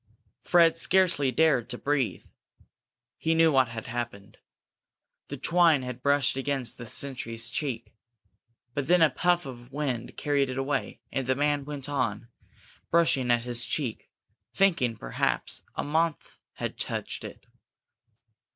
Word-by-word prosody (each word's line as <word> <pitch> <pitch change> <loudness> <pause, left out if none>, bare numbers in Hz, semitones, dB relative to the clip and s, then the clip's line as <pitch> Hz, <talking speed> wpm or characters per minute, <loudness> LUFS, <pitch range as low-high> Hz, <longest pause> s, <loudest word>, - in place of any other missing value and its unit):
Fred 165 -1 +4
scarcely 175 -8 +3
dared 135 -3 +2
to 120 - -4
breathe. 140 -4 -1 0.9
He 165 0 +1
knew 165 0 +5
what 130 -3 +4
had 115 -1 -7
happened. 115 -4 -6 0.9
The - - -6
twine 165 -5 +3
had 125 0 -6
brushed 140 0 +2
against 135 -2 -3
the 120 - -7
sentry's 115 -3 -3
cheek. 120 -7 -4 0.8
But 140 0 -2
then 175 0 +5
a 155 - +5
puff 175 +4 +2
of 120 -1 -10
wind 130 -5 -3
carried 140 -2 +1
it 130 - -4
away, 135 +2 -2
and 135 -2 -2
the 130 - +2
man 145 0 0
went 145 -2 -6
on, 120 -6 -2 0.6
brushing 150 -7 +3
at 120 -1 +3
his 120 -1 +2
cheek, 130 -6 -3 0.5
thinking, 165 - +2
perhaps, - - -2
a - - -2
moth 160 +2 -1
had - - -5
touched - - -4
it. - - -10
135 Hz, 140 wpm, -27 LUFS, 120-150 Hz, 0.9 s, knew